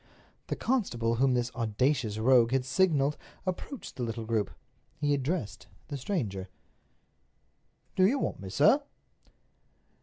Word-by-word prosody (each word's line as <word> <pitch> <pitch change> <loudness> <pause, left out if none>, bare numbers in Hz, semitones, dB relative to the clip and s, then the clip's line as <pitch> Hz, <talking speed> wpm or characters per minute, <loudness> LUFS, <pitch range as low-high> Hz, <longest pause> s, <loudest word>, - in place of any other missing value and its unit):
The - - -2
constable 120 - 0
whom 130 0 +3
this 120 0 0
audacious 115 0 0
rogue 120 +1 +4
had 130 -1 +2
signaled 150 -1 +2 0.3
approached 190 +8 -5
the - - -4
little 115 -1 -3
group. 110 -2 0 0.5
He 145 -1 +2
addressed 135 - -2 0.2
the 145 - -3
stranger: 110 - -3 1.5
"Do 185 0 +5
you 265 +7 +2
want - - -2
me, 95 -1 -7
sir?" 210 - +5
130 Hz, 125 wpm, -30 LUFS, 115-155 Hz, 1.5 s, Do